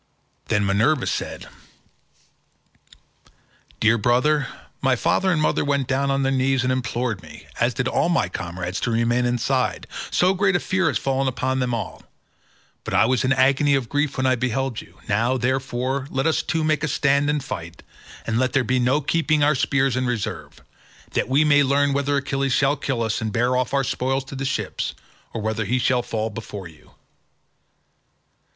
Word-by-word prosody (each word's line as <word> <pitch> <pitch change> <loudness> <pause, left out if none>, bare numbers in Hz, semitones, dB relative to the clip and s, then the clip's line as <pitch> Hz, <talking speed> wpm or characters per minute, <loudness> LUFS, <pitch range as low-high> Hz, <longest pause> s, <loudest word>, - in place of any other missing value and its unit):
Then 105 -1 +1
Minerva 115 +9 +2
said, - - -4 2.3
"Dear 115 +1 +3
brother, 130 +5 +2 0.3
my 130 -1 +3
father 190 +9 +1
and 165 - +1
mother 155 - +1
went 140 -2 0
down 135 +1 0
on 135 0 +1
their 135 - +1
knees 135 0 +1
and 130 - +1
implored 120 -4 -2
me, 80 -3 -13
as 120 0 +1
did 125 +2 -1
all 170 - +1
my 165 - +2
comrades, 90 +1 -4
to - - -1
remain 120 +2 +1
inside, 125 +2 0 0.2
so 185 +1 +3
great 190 0 +2
a - - +3
fear 185 -1 0
has 145 - +1
fallen 135 0 0
upon 130 +1 -1
them 125 -2 0
all; 115 - -6 0.8
but - - -3
I - - +5
was 125 0 +1
in 130 - +1
an 130 - +2
agony 140 +2 +4
of 130 -4 -2
grief 145 -1 -1
when 130 - 0
I 130 - +4
beheld 130 0 -1
you; - - -18
now, 115 +5 +1
therefore, 130 +1 -1
let 135 0 -1
us 160 - +2
two 160 -1 -1
make 155 0 +1
a - - +1
stand 140 0 +2
and 150 -2 0
fight, 85 -9 -7 0.4
and 115 0 0
let 130 -1 0
there 135 - +3
be 125 +1 +1
no 130 +4 +2
keeping 155 0 +1
our 150 +1 +4
spears 135 -1 +1
in 130 0 0
reserve, 120 -4 -4 0.5
that - - -1
we 140 +4 +4
may 145 -1 +5
learn 140 +1 +2
whether 140 +1 +1
Achilles 135 -1 -1
shall 140 +1 +3
kill 130 -4 -2
us 110 +1 -1
and 110 -1 -2
bear 120 +4 +1
off 125 0 0
our 140 -1 +1
spoils 135 +2 -1
to 135 +1 -9
the 135 0 -3
ships, 130 - -2 0.4
or 115 - -4
whether 110 +1 -1
he 120 +6 +1
shall 125 0 +2
fall 110 -1 -3
before 105 -3 -7
you." 80 -2 -19
130 Hz, 190 wpm, -23 LUFS, 120-140 Hz, 2.3 s, I